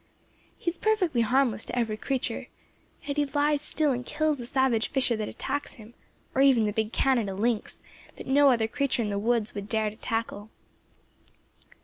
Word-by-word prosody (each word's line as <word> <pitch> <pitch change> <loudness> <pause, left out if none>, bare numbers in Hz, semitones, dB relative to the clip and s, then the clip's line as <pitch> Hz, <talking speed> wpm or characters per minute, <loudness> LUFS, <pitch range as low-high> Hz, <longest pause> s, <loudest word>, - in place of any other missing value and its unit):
He 340 - -1
is 340 - -11
perfectly 370 - +2
harmless 230 -2 +2
to 245 - -5
every 225 -3 0
creature; 265 +4 -3 0.6
yet 285 0 -3
he 295 - +3
lies 290 +1 +1
still 300 -1 +1
and 250 -1 -2
kills 305 +2 0
the 240 - -5
savage 260 -4 +1
fisher 255 -3 +1
that 215 -1 -3
attacks 285 +2 -4
him, 220 +1 -14 0.4
or 265 - +2
even 260 -5 +5
the 210 - -1
big 220 0 -1
Canada 235 -9 +1
lynx, 225 +2 -1 0.3
that - - -9
no 280 +1 +5
other 230 -4 +2
creature 255 0 0
in 210 - -2
the 200 - -1
woods 225 0 0
would 205 0 -6
dare 220 -2 0
to - - -14
tackle. 225 -2 -3
245 Hz, 185 wpm, -27 LUFS, 220-280 Hz, 0.6 s, even